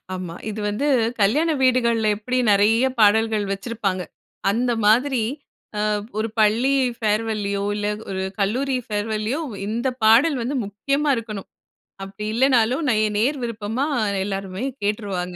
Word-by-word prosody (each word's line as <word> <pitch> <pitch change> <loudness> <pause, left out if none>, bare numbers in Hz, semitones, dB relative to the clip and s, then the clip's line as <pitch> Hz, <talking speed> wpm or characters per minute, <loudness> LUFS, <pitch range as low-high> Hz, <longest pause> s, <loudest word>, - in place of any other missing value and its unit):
ஆமா. 180 -2 -6 0.2
இது 215 0 -5
வந்து 255 +8 -2 0.3
கல்யாண 290 +12 +3
வீடுகள்ல 235 -4 +3
எப்படி 250 +4 -2
நெறைய 215 +5 +4
பாடல்கள் 215 0 +4
வச்சிருப்பாங்க. 195 -3 -2 0.5
அந்த 240 +4 +1
மாதிரி, 250 +2 +3 0.6
அ - - 0 0.4
ஒரு 225 +1 0
பள்ளி 235 +6 +3 0.2
ஃபேர்வல்லியோ, 210 -2 -1
இல்ல 205 0 -2 0.2
ஒரு 190 0 -3 0.2
கல்லூரி 255 +7 0
ஃபேர்வல்லியோ 215 +6 -2
ஒ - - -8 0.2
இந்த 235 +4 -1 0.2
பாடல் 255 +7 +5
வந்து 270 +4 -2
முக்கியமா 275 +9 -1
இருக்கணும். 215 -4 -7 0.6
அப்படி 195 +2 -7
இல்லன்னாலும் 255 +3 +2
நேய 215 0 +2
நேயர் 260 +5 +1
விருப்பமா 230 +3 -2 0.4
எல்லோருமே 195 +3 -4 0.2
கேட்டுருவாங்க. 195 -4 -2
220 Hz, 125 wpm, -22 LUFS, 205-250 Hz, 0.6 s, பாடல்